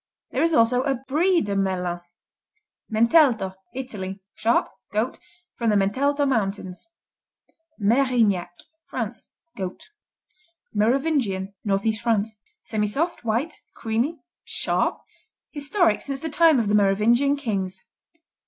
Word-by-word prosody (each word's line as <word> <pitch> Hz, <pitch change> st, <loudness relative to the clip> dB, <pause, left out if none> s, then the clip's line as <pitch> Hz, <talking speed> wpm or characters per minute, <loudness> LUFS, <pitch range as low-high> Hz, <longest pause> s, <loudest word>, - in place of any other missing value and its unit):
There -, -, 0 dB
is 330 Hz, -1 st, +3 dB
also 235 Hz, +2 st, +4 dB
a 275 Hz, 0 st, 0 dB
Brie 310 Hz, +8 st, +2 dB
de 200 Hz, -1 st, -2 dB
Melun. 180 Hz, -3 st, -1 dB, 0.9 s
Mentelto 230 Hz, -, +4 dB, 0.2 s
Italy 205 Hz, -7 st, -5 dB
Sharp; 230 Hz, +2 st, +2 dB, 0.2 s
goat; 220 Hz, +4 st, -1 dB, 0.3 s
from 230 Hz, -2 st, -1 dB
the 210 Hz, -, +3 dB
Mentelto 280 Hz, +9 st, +2 dB
mountains 200 Hz, -, -2 dB, 0.9 s
Merignac 225 Hz, -5 st, +2 dB, 0.4 s
France -, -, -5 dB, 0.3 s
Goat. 190 Hz, -, -6 dB, 0.8 s
Merovingian 220 Hz, -4 st, +1 dB
Northeast 210 Hz, +1 st, 0 dB
France 220 Hz, -2 st, 0 dB, 0.3 s
Semisoft; 220 Hz, +12 st, -1 dB
white; 235 Hz, +8 st, 0 dB, 0.2 s
creamy; 235 Hz, +9 st, -1 dB, 0.3 s
sharp; -, -, -1 dB, 0.5 s
historic 290 Hz, -, +1 dB
since 275 Hz, -1 st, -4 dB
the 320 Hz, -, -4 dB
time 320 Hz, -1 st, +5 dB
of 230 Hz, -4 st, +1 dB
the 205 Hz, -, +1 dB
Merovingian 215 Hz, +7 st, +4 dB
kings. 195 Hz, -8 st, -3 dB
225 Hz, 105 wpm, -24 LUFS, 200-275 Hz, 0.9 s, time